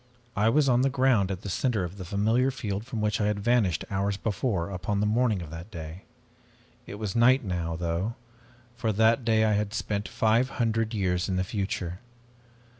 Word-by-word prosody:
I 105 +3 +3
was 140 +4 +3
on 125 -1 +4
the 135 - +3
ground 125 -7 +2
at 95 -1 -4
the - - -7
center 110 0 0
of 90 +3 -6
the 95 - -7
familiar 110 +8 +2
field 105 -5 -4
from 115 -4 -4
which 105 0 0
I 105 - +2
had 105 -1 0
vanished 105 -6 +1
hours 100 0 0
before, 100 -4 -1
upon 95 +2 -2
the 105 - +1
morning 110 -3 +1
of 80 - -10
that 85 +4 -8
day. 85 -1 -8 0.8
It - - -7
was 105 0 -4
night 125 +3 +5
now, 85 -4 -2
though, 85 +6 -2 0.6
for 120 -2 -1
that 110 +3 +3
day 110 -1 +3
I 110 - +2
had 105 +1 -1
spent 105 -2 -2
five 115 +4 +2
hundred 115 -1 0
years 90 -3 0
in 95 - 0
the 95 - +1
future. 95 -2 -3
105 Hz, 195 wpm, -27 LUFS, 95-115 Hz, 0.8 s, night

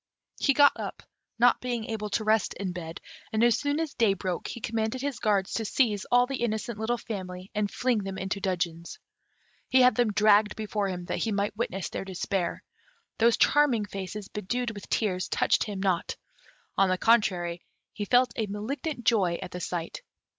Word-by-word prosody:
He 275 - +3
got 285 -1 +7
up, - - -6 0.3
not 240 +1 +4
being 240 -3 -2
able 215 -2 -4
to 210 +2 -1
rest 215 -1 +2
in 195 -2 -3
bed; 165 -2 -7 0.3
and 220 +1 +2
as 240 -1 +4
soon 285 +1 0
as 320 -3 -2
day 215 -4 +3
broke, 185 -1 -3
he - - -6
commanded 220 +2 -2
his 280 -2 -3
guards 200 -3 +1
to 225 - -1
seize 210 -3 +1
all 245 0 +4
the 270 0 -4
innocent 220 -1 -2
little 235 +2 0
family, 185 -4 -7
and 210 -1 0
fling 245 -1 0
them 195 -1 -5
into 190 +1 -3
dungeons. 170 -3 -2 0.7
He 260 - +5
had 250 0 +6
them 240 -3 +2
dragged 210 0 +4
before 210 -2 -2
him, 180 -2 -4
that - - -3
he 225 - -1
might 205 0 -1
witness 195 -4 -2
their - - -4
despair. 190 -1 -2 0.6
Those 230 +1 +4
charming 265 -7 +3
faces, 200 0 -6
bedewed 235 +4 -3
with 205 -2 -10
tears, 185 -4 0
touched - - +2
him 205 -3 -5
not; 190 -3 0 0.6
on 195 -1 +3
the 185 - +1
contrary, 180 -6 +2 0.3
he 205 - -4
felt 250 +3 +3
a 220 -2 -1
malignant 240 - -4
joy 190 -8 +3
at 180 - -7
the 180 - -5
sight. 170 -1 -4
210 Hz, 190 wpm, -28 LUFS, 190-235 Hz, 0.7 s, got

